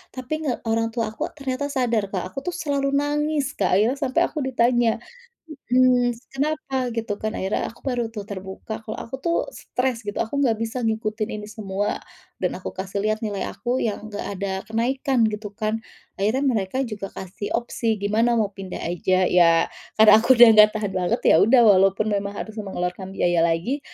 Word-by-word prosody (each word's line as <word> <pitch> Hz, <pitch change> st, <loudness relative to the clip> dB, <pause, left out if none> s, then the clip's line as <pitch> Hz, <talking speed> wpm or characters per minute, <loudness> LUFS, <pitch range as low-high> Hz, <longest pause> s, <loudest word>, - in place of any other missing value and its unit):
Tapi 255 Hz, +2 st, -5 dB
nge 265 Hz, -, +1 dB, 0.2 s
orang 225 Hz, 0 st, +1 dB
tua 230 Hz, -2 st, -1 dB
aku 220 Hz, -, -3 dB
ternyata 275 Hz, -1 st, -3 dB
sadar, 245 Hz, -6 st, 0 dB
Kak, 185 Hz, -3 st, -1 dB
aku 185 Hz, -, -5 dB
tuh 360 Hz, -, -2 dB
selalu 280 Hz, -4 st, -1 dB
nangis 295 Hz, +1 st, 0 dB
Kak, 190 Hz, -, +1 dB
akhirnya 225 Hz, +8 st, +2 dB
sampai 275 Hz, +3 st, +1 dB
aku 310 Hz, -, -5 dB
ditanya, 240 Hz, -2 st, +3 dB, 0.8 s
mhm, 250 Hz, -1 st, +4 dB, 0.2 s
"Kenapa?" 285 Hz, 0 st, -2 dB, 0.2 s
gitu 225 Hz, -2 st, -2 dB
kan, 215 Hz, -, -1 dB
akhirnya 190 Hz, +2 st, -1 dB
aku 230 Hz, -, -12 dB
baru 245 Hz, -2 st, 0 dB
tuh 210 Hz, -2 st, -5 dB
terbuka 190 Hz, +2 st, -6 dB
kalau 215 Hz, -, -5 dB
aku 235 Hz, -, -6 dB
tuh 335 Hz, +3 st, 0 dB, 0.2 s
stres 250 Hz, -1 st, -2 dB
gitu, 205 Hz, -, -4 dB
aku 255 Hz, +6 st, -3 dB
enggak 250 Hz, -5 st, +3 dB
bisa 230 Hz, +2 st, -3 dB
ngikutin 220 Hz, 0 st, -1 dB
ini 210 Hz, -, -9 dB
semua 205 Hz, -1 st, -3 dB, 0.4 s
dan -, -, -1 dB
aku -, -, -6 dB
kasih 195 Hz, +1 st, -4 dB
lihat 215 Hz, 0 st, 0 dB
nilai 205 Hz, -3 st, -3 dB
aku 245 Hz, +2 st, -2 dB
yang 215 Hz, -1 st, -3 dB
enggak 205 Hz, -1 st, -5 dB, 0.2 s
ada 200 Hz, -1 st, -2 dB
kenaikan 245 Hz, +1 st, +1 dB
gitu 210 Hz, -1 st, -5 dB
kan. 215 Hz, +1 st, -3 dB, 0.3 s
Akhirnya 220 Hz, +8 st, 0 dB
mereka 225 Hz, -5 st, 0 dB
juga 210 Hz, -3 st, -5 dB
kasih 190 Hz, +2 st, -7 dB
opsi, 230 Hz, -1 st, -1 dB
"Gimana 220 Hz, +4 st, +2 dB
mau 205 Hz, -2 st, 0 dB
pindah 190 Hz, -2 st, -7 dB
aja?" 185 Hz, +2 st, +1 dB
ya, 170 Hz, -2 st, +4 dB, 0.3 s
karena 220 Hz, 0 st, +9 dB
aku 250 Hz, +3 st, +5 dB
udah 240 Hz, 0 st, +9 dB
enggak 215 Hz, -1 st, +8 dB
tahan 210 Hz, -2 st, -2 dB
banget 180 Hz, +7 st, 0 dB
ya -, -, +7 dB
udah, 240 Hz, +3 st, +6 dB
walaupun 195 Hz, +1 st, +4 dB
memang 200 Hz, 0 st, -1 dB
harus 220 Hz, -, -7 dB
mengeluarkan 190 Hz, -2 st, -4 dB
biaya 175 Hz, -2 st, +2 dB
lagi, 170 Hz, -, 0 dB
220 Hz, 185 wpm, -23 LUFS, 200-255 Hz, 0.8 s, karena